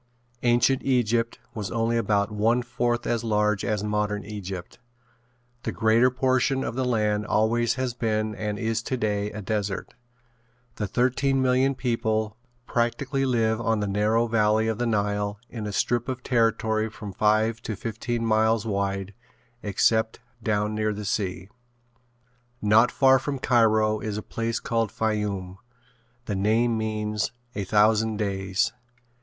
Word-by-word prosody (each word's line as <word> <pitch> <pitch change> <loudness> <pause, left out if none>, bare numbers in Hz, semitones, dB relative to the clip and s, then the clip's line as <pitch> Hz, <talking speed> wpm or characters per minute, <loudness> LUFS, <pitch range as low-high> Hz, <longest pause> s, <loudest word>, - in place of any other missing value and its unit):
Ancient 120 +2 +3
Egypt 120 -3 +1 0.2
was 105 -4 -4
only 115 0 0
about 105 -2 +1
one 115 +4 +2
fourth 120 0 -1
as 115 -1 0
large 105 -2 +1
as 105 -1 -1
modern 105 0 -1
Egypt. 95 -4 -7 0.8
The - - -3
greater 115 +3 +4
portion 130 +1 +1
of - - -3
the 130 +1 -1
land 105 -3 0
always 115 +2 +2
has 130 -2 -2
been 110 -2 -1
and 105 -1 -3
is 115 0 -1
today 105 -5 -1
a 105 0 -7
desert. 105 -1 -3 0.8
The 105 - -2
thirteen 130 +5 +1
million 130 +1 +2
people 110 -4 -1 0.3
practically 135 +4 0
live 115 -2 +1
on 115 -1 +1
the 105 - -1
narrow 105 +4 +2
valley 110 -1 +2
of 110 0 -1
the 120 - 0
Nile 105 -1 0
in 110 -3 -5
a - - -3
strip 120 +4 0
of 130 -1 -4
territory 110 -2 +1
from 105 -2 -8
five 110 +3 +2
to 110 - -4
fifteen 115 +3 -3
miles 110 0 +2
wide 100 -2 -2 0.5
except 110 +2 +1 0.2
down 105 -1 0
near 110 0 0
the 105 0 -6
sea. 95 -2 -2 1.1
Not 110 +3 +5
far 135 -1 +5
from 140 +1 -3
Cairo 110 -4 +3
is 105 -1 -4
a 105 - -4
place 115 0 -2
called 115 -3 -1
Fayoum. 105 -4 -2 0.7
The 105 - -2
name 110 +4 +2
means 110 -1 -2 0.2
"A 100 - -3
Thousand 110 +2 +3
Days." 95 -2 -1
110 Hz, 145 wpm, -25 LUFS, 105-120 Hz, 1.1 s, Not